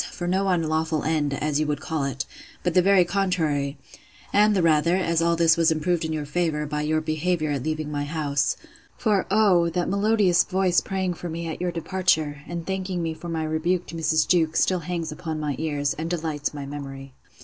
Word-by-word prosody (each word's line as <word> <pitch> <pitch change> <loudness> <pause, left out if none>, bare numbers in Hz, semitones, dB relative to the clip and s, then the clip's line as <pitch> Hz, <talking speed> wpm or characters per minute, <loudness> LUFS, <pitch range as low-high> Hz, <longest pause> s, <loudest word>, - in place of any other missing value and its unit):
for 175 - -5
no 190 +2 +1
unlawful 160 -3 0
end, 155 -2 0
as 150 +1 -1
you 155 - 0
would 145 -1 -1
call 155 -2 -2
it; 135 -1 -3 0.4
but 175 - 0
the 185 - +5
very 190 -1 +5
contrary: 160 -7 0 0.6
and 210 +1 +5
the 185 - +2
rather, 165 +1 +3
as 170 -3 +1
all 170 0 +3
this 165 -1 +4
was 165 0 +3
improved 165 +2 0
in 160 - -2
your 155 -2 -2
favour, 150 -1 -1
by 150 0 -2
your 155 +1 +1
behaviour 155 0 -1
at 140 -2 -1
leaving 155 +1 -3
my 145 -1 -2
house: 145 -2 0 0.4
For, 210 -5 +1
oh! 190 -5 +4
that 175 +1 -1
melodious 200 -3 +3
voice 185 -1 +2
praying 190 -2 -2
for 175 +1 -7
me 165 +1 -4
at 160 - -5
your 180 -1 0
departure, 165 -4 0
and 170 -1 -5
thanking 190 -2 -2
me 165 -1 -2
for 170 +2 -8
my 160 -1 -2
rebuke 165 +3 0
to - - -7
Mrs. 160 -1 +1
Jewkes, 165 -3 +2
still 185 -1 +2
hangs 165 -1 -4
upon 155 0 -5
my 150 -2 -2
ears, 145 -3 -1
and 160 +2 -4
delights 160 -4 -2
my 145 -2 -6
memory. 135 -1 -8
160 Hz, 205 wpm, -24 LUFS, 150-180 Hz, 0.6 s, the